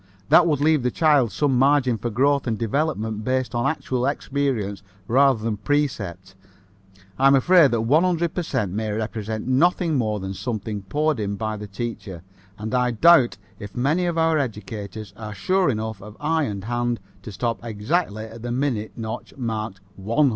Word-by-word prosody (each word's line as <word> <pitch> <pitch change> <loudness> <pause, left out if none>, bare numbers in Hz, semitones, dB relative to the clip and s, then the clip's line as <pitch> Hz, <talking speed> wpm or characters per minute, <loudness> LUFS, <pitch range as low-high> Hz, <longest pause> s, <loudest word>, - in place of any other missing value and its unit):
That 175 - +7
would 150 -4 +1
leave 155 -1 +3
the 125 - +1
child 145 -6 +3
some 135 +4 +1
margin 130 -4 +3
for 120 - -2
growth 135 +4 +2
and 110 -2 0
development 110 -3 -1
based 130 +1 -1
on 120 0 +1
actual 130 -5 -2
experience 130 -9 -2 0.3
rather 130 -2 +3
than 110 -2 -1
precept. 100 - -2 0.9
I'm 135 +1 +6
afraid 175 +4 +6
that - - +4
the 115 -3 0
100 165 +7 +2
per 180 - -1
cent 125 - -2
may 110 +2 -2
represent 110 0 -3
nothing 160 +3 +2
more 110 -3 -1
than 95 0 -5
something 105 -1 -4
poured 150 +7 0
in 100 -1 -2
by 110 +1 -3
the 105 0 -7
teacher, 100 -4 -6 0.3
and 110 +2 -5
I 125 -1 +2
doubt 130 +2 +5 0.2
if 100 -1 -9
many 155 +8 +1
of 170 -1 -1
our 160 -1 +3
educators 105 -4 -5
are 105 -2 -7
sure 185 - +1
enough 110 -3 -3
of 105 +2 -11
eye 160 +1 +1
and 100 -4 -5
hand 120 +1 -1 0.2
to 110 - -8
stop 115 +1 -3
exactly 110 - -1
at 115 +1 -11
the 120 - -5
minute 120 -4 -1
notch 110 +4 -6
marked 110 -5 -4 0.2
100. 115 +9 +2
120 Hz, 175 wpm, -23 LUFS, 105-145 Hz, 0.9 s, That